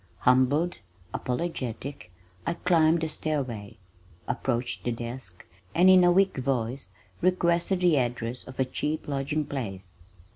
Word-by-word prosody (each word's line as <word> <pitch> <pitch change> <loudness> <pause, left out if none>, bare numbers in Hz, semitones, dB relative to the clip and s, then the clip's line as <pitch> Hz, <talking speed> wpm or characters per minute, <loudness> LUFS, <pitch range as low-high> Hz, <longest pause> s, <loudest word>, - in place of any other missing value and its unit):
Humbled, 130 +7 +3 0.3
apologetic, 135 - -4 0.4
I 170 - 0
climbed 165 -2 +3
the 160 - 0
stairway, 130 -10 -3 0.5
approached 120 -1 -1
the 120 - 0
desk, 115 -5 -6 0.3
and 185 +2 +7
in 185 -1 +7
a 175 - +6
weak 190 -1 +3
voice 130 -3 -2 0.3
requested 180 +1 +2
the 175 -4 +4
address 120 0 -3
of 130 - -11
a 130 - +3
cheap 150 +4 -3
lodging 145 +2 -1
place. 95 -10 -5
135 Hz, 130 wpm, -27 LUFS, 120-170 Hz, 0.5 s, and